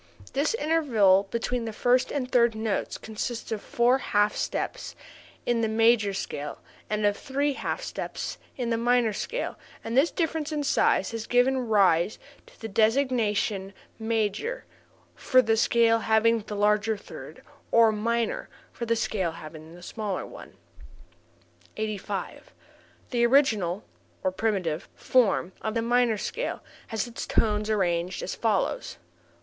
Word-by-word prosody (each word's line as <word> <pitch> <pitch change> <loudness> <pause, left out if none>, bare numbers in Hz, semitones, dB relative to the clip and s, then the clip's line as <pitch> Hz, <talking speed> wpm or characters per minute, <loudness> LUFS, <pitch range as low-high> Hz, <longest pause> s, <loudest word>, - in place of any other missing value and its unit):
This 285 +10 +1
interval 230 - +3
between 235 +1 -2
the 225 - -3
first 245 +4 +2
and 255 -3 -3
third 235 -2 +4
tones 220 -1 -2
consists 225 +2 -5
of 215 -2 -2
four 245 +3 +2
half 205 -4 +1
steps - - -3 0.5
in 240 -1 +1
the 225 - +2
major 220 -1 +3
scale 150 -6 -5 0.3
and 210 0 0
of 205 0 +3
three 280 +4 -1
half - - -3
steps - - -5 0.2
in 240 -2 -2
the 230 - +1
minor 240 -2 +2
scale 480 - -4 0.2
and 230 - -4
this 280 +6 +5
difference 320 -2 -2
in 300 -1 -1
size 275 - +2
has 225 -1 -5
given 250 0 +2
rise 195 -3 +3 0.3
to - - -20
the 225 - -5
designation 220 -3 +1 0.3
major 225 - -1 0.5
for 255 - +3
the 225 -3 +3
scale 230 0 +3
having 225 +1 +3
the 210 0 -7
larger 210 +1 +2
third, - - -11 0.3
and 225 -2 +5
minor 235 +1 -1 0.2
for 235 - -5
the 230 - +2
scale 195 -7 -1
having 155 +1 -10
the 175 - -13
smaller 210 -1 -4
one. - - -12 1.2
85. 215 -2 -4 0.6
The 240 -2 +2
original 220 -8 +3 0.4
(or 185 - +1
primitive) 185 -6 -1
form 220 -7 +2
of 220 +1 -3
the 230 - +1
minor 240 -1 +2
scale 480 - -4 0.2
has 220 -3 -2
its 235 -1 -6
tones 210 -1 +1
arranged 180 -3 0
as - - -3
follows. 225 - -1
225 Hz, 145 wpm, -27 LUFS, 205-245 Hz, 1.2 s, this